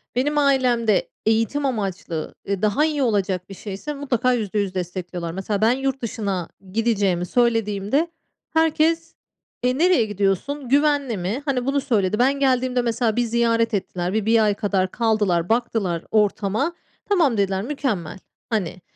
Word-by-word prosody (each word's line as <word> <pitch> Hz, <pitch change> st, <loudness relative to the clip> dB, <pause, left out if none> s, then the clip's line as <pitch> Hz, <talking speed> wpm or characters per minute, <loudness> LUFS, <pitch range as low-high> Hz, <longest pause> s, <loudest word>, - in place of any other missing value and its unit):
Benim 290 Hz, +4 st, +1 dB
ailemde 250 Hz, -7 st, +2 dB, 0.2 s
eğitim 225 Hz, +6 st, +1 dB
amaçlı, 195 Hz, -9 st, -3 dB
ııı, 200 Hz, -1 st, -1 dB
daha 215 Hz, +8 st, +2 dB
iyi 300 Hz, -3 st, 0 dB
olacak 195 Hz, -5 st, 0 dB
bir -, -, -7 dB
şeyse 205 Hz, +10 st, -6 dB
mutlaka 255 Hz, -3 st, 0 dB
%100 205 Hz, -4 st, -1 dB
destekliyorlar. 180 Hz, -1 st, -4 dB
Mesela 195 Hz, +3 st, -3 dB
ben 220 Hz, +2 st, +5 dB
yurt 270 Hz, +1 st, -1 dB
dışına 205 Hz, -7 st, -3 dB, 0.2 s
gideceğimi 200 Hz, -6 st, +1 dB
söylediğimde 225 Hz, -, +1 dB, 0.5 s
herkes, 320 Hz, +1 st, +2 dB, 0.5 s
eee, 250 Hz, +1 st, +1 dB
"Nereye 340 Hz, -7 st, +4 dB
gidiyorsun? 210 Hz, +7 st, -1 dB
Güvenli 285 Hz, -4 st, +2 dB
mi?" 190 Hz, +9 st, -2 dB
hani, 260 Hz, -4 st, 0 dB
bunu 275 Hz, +1 st, +1 dB
söyledi. 215 Hz, -6 st, 0 dB
Ben 270 Hz, +3 st, +3 dB
geldiğimde 255 Hz, -2 st, +2 dB
mesela 235 Hz, -2 st, 0 dB
bir 245 Hz, -, +2 dB
ziyaret 230 Hz, -1 st, +1 dB
ettiler, 180 Hz, -2 st, -2 dB
bi 215 Hz, -1 st, 0 dB
bir 225 Hz, 0 st, +4 dB
ay 210 Hz, -1 st, +3 dB
kadar 195 Hz, -3 st, 0 dB
kaldılar, 210 Hz, -7 st, +1 dB
baktılar 220 Hz, -7 st, 0 dB
ortama, 215 Hz, -, +1 dB, 0.4 s
"Tamam." 325 Hz, -, +3 dB
dediler. 195 Hz, -1 st, 0 dB
"Mükemmel." 225 Hz, -, -3 dB, 0.3 s
hani, 185 Hz, -4 st, -2 dB
225 Hz, 140 wpm, -22 LUFS, 195-265 Hz, 0.5 s, ben